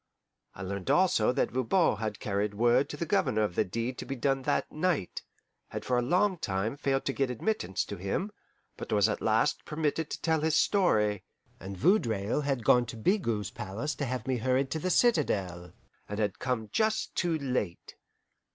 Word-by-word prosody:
I 100 - -7
learned 95 0 -4
also 175 -12 +4
that 135 - 0
Voban 130 - +2
had 105 -1 -4
carried 100 0 -1
word 120 +5 +3
to 145 - -6
the 170 - -2
Governor 110 -8 +1
of 105 - -1
the - - +2
deed 115 +6 -4
to - - -5
be 135 - -3
done 135 +2 0
that - - -1
night; 155 - -1 0.5
had - - -6
for 125 - +1
a 120 - +3
long 180 +8 +2
time 100 +3 -2
failed 135 -1 -1
to 135 - 0
get 135 -1 0
admittance 125 - -1
to 100 - -6
him, 100 - -2 0.5
but - - -7
was - - +4
at - - -2
last - - +1
permitted 155 0 -2
to - - -5
tell 160 -2 +1
his 160 0 +2
story; 105 - +2 0.4
and 95 +1 -7
Vaudreuil 115 - +2
had 135 -4 -1
gone 120 -1 +5
to 115 - -7
Bigot's 110 - 0
palace 105 +10 -4
to 145 - -3
have 125 -2 -3
me 130 -1 0
hurried 130 +3 0
to 160 - -1
the 185 - -2
citadel, 100 - +1 0.4
and 105 - -4
had 105 -3 -1
come 125 -4 -2
just 220 - 0
too 170 -3 0
late. 125 - -3
125 Hz, 190 wpm, -29 LUFS, 105-155 Hz, 0.5 s, gone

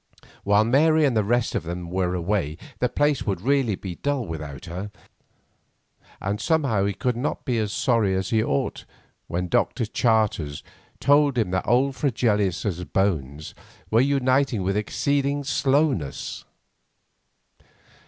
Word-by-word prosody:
While 100 +1 +4
Mary 155 +6 +4
and 135 -4 +1
the 110 - +3
rest 120 +3 +1
of - - 0
them 85 +1 -6
were 90 -1 0
away 85 -4 -1 0.2
the 125 - +1
place 145 -1 +1
would 95 -4 0
really 130 -1 +1
be 95 -1 -6
dull 140 -4 -1
without 75 -4 -7
her, 90 +5 -6 1.3
and 100 +2 -3
somehow 140 - +1
he 100 - 0
could 125 -2 -1
not 125 +5 -3
be 125 -5 0
as 105 -2 -1
sorry 110 -5 +1
as 95 0 -2
he 110 -1 +3
ought 70 - -2 0.4
when 90 +1 -2
Dr. 115 +7 +1
Charters 105 -10 0 0.4
told 145 -2 +3
him 110 -6 +1
that 95 0 -1
old 130 +4 +3
Mr. - - -19
Fregelius's 105 - 0
bones 75 -7 -1 0.4
were 115 +2 +5
uniting 130 -4 +2
with 95 +2 0
exceeding 140 +6 0
slowness. 135 - 0
110 Hz, 145 wpm, -24 LUFS, 95-135 Hz, 1.3 s, were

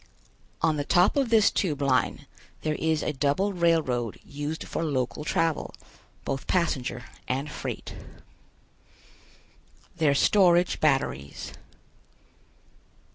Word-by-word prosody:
On 160 -1 +3
the 145 - -1
top 180 +6 +3
of 275 -4 +1
this 220 -3 +5
Tube 155 -7 -1
Line 135 -2 +1 0.4
there 155 - 0
is 160 0 0
a 155 - -1
double 145 +9 0
railroad 160 - +1
used 145 +3 -5
for - - -3
local 140 -1 -2
travel, 160 0 -1 0.5
both 135 0 -3
passenger 135 -9 -1 0.2
and 135 +4 -2
freight. - - -6 2.0
THEIR 150 -4 +3
STORAGE 175 +1 +4
BATTERIES. 70 - -1
150 Hz, 105 wpm, -27 LUFS, 135-170 Hz, 2.0 s, this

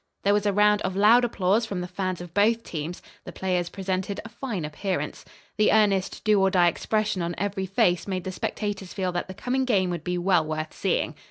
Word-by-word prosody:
There 200 - +4
was 205 0 +1
a - - +3
round 210 +1 +4
of 190 0 -2
loud 220 +5 +6
applause 220 0 +1
from 195 -4 -3
the 180 - -4
fans 185 -1 -3
of 175 -2 -10
both 225 +4 +3
teams. 165 +2 -6 0.2
The - - -8
players 180 -1 -1
presented 190 +1 -3
a - - -7
fine 220 - -4
appearance. 180 +5 -3 0.3
The 215 - +4
earnest, 200 -3 +2
"do 210 -2 +4
or 195 - +4
die" 180 -2 +4
expression 215 +1 -1
on 170 0 -2
every 195 -1 -2
face 180 -1 +1
made 185 -2 -2
the 190 - -4
spectators 195 0 -4
feel 185 -2 -1
that 175 0 -3
the 190 - -8
coming 260 +5 -1
game 195 -8 +1
would 170 -2 -4
be 180 0 -2
well 175 -2 +3
worth 155 0 -4
seeing. - - -1
190 Hz, 220 wpm, -25 LUFS, 180-210 Hz, 0.3 s, loud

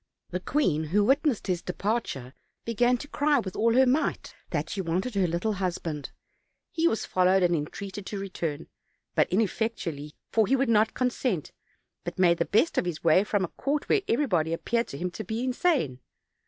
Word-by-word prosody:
The 180 - -2
queen, 180 - +1
who 200 +7 +2
witnessed 275 +1 +2
his 180 -2 -1
departure, 180 - -3 0.3
began 240 +2 +2
to 290 - -8
cry 290 0 +2
with 195 -7 -3
all 230 +1 +2
her 260 +1 +6
might 270 +5 0 0.2
that - - -2
she 195 - -2
wanted 185 +7 -1
her 195 -3 +2
little 170 +6 -1
husband; 170 -6 -3 0.6
he 335 0 +2
was 225 - 0
followed 185 +1 +3
and 175 -1 +3
entreated 190 +6 -5
to 205 - -4
return, 175 -6 -4 0.5
but - - +2
ineffectually, 185 -7 -1 0.2
for 220 -3 +3
he 270 - +3
would 270 -2 +1
not 220 0 +3
consent; 250 - -1 0.5
but - - -5
made 175 -2 +4
the - - +2
best 225 +11 +2
of - - -2
his 175 -3 -4
way 165 +3 +5
from 205 -2 0
a - - -9
court 285 +1 -2
where 415 - +4
everybody 180 - +1
appeared 235 +7 0
to 140 - -7
him 180 +3 -3
to 220 - -6
be 220 +5 -3
insane. 255 - +1
200 Hz, 185 wpm, -27 LUFS, 175-245 Hz, 0.6 s, her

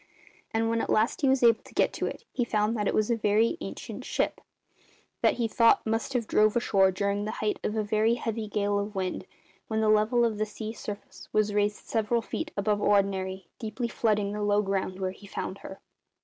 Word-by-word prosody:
And 225 0 +1
when 230 0 +1
at - - -4
last 220 +3 +2
he 275 - +4
was 265 -1 +2
able 230 -1 +5
to - - -17
get - - +2
to - - -2
it 465 - -7
he 245 - +1
found 215 -1 0
that 210 -2 -1
it - - +1
was 215 +2 +2
a - - +3
very 220 +4 +2
ancient - - -7
ship, - - -1 0.8
that - - +4
he 235 -2 0
thought 230 +1 +4
must 225 +4 -1
have 240 -3 0
drove 215 0 +3
ashore 195 -5 +3
during 200 +2 -1
the 215 - -3
height 210 -1 -1
of 210 - -1
a 215 - +1
very 215 +2 +2
heavy 225 -2 -3
gale 205 0 0
of 205 +1 -4
wind, 185 -1 -3 0.4
when 220 -1 -1
the 220 -1 +2
level 215 +3 +4
of 220 -2 -1
the 215 - +1
sea 215 +1 -6
surface 210 -2 -8
was 215 -1 +1
raised 205 0 0
several 225 +1 0
feet 315 +7 -4
above 205 +1 +1
ordinary, 190 -2 +1
deeply 230 +2 -3
flooding 210 -3 0
the 210 0 -4
low 205 0 +2
ground 195 -1 -2
where 185 -1 -1
he 200 +2 -14
found 190 0 -5
her. 190 - -9
215 Hz, 220 wpm, -28 LUFS, 205-225 Hz, 0.8 s, able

